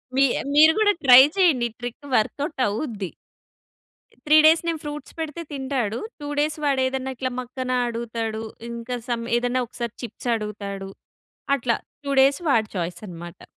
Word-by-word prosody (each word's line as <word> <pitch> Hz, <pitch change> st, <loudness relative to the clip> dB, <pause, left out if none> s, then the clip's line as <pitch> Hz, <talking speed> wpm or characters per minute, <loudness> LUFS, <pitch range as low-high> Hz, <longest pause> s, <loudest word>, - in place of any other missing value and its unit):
మీ 275 Hz, -, +5 dB, 0.3 s
మీరు 315 Hz, +2 st, +8 dB
కూడా 415 Hz, -1 st, +4 dB
ట్రై 255 Hz, -1 st, +10 dB, 0.2 s
చేయండి. 295 Hz, -11 st, +4 dB
ఈ -, -, -30 dB
ట్రిక్ 245 Hz, +3 st, -7 dB
వర్క్ఔట్ 280 Hz, +6 st, -1 dB
అవుద్ది. 210 Hz, -, -4 dB, 1.2 s
త్రీ 305 Hz, +1 st, +7 dB
డేస్ 320 Hz, +1 st, +6 dB
నేను 330 Hz, -2 st, -1 dB
ఫ్రూట్స్ 295 Hz, 0 st, -7 dB
పెడితే 320 Hz, +1 st, -4 dB
తింటాడు. 260 Hz, -6 st, -2 dB, 0.2 s
టూ 290 Hz, -, -5 dB
డేస్ 300 Hz, +1 st, 0 dB
వాడు 275 Hz, -2 st, +2 dB
ఏదైనా 265 Hz, 0 st, -3 dB
ఇట్లా 255 Hz, +1 st, -3 dB
మక్కన 255 Hz, +1 st, -5 dB, 0.2 s
అడుగుతాడు. 230 Hz, -1 st, -4 dB, 0.3 s
ఇంకా 235 Hz, +1 st, -5 dB
సమ్ 230 Hz, -1 st, -1 dB
ఏదన్నా 245 Hz, +1 st, 0 dB
ఒకసారి 235 Hz, -1 st, -5 dB
చిప్స్ 240 Hz, +2 st, -6 dB
అడుగుతాడు. 200 Hz, -2 st, -5 dB, 0.7 s
అట్లా 235 Hz, -3 st, 0 dB, 0.3 s
టూ 280 Hz, -, -2 dB
డేస్ 275 Hz, +3 st, +4 dB
వాడి 220 Hz, -5 st, +2 dB
ఛాయస్ 175 Hz, +2 st, -4 dB
అన్నమాట. 175 Hz, 0 st, -10 dB
250 Hz, 150 wpm, -23 LUFS, 225-285 Hz, 1.2 s, ట్రై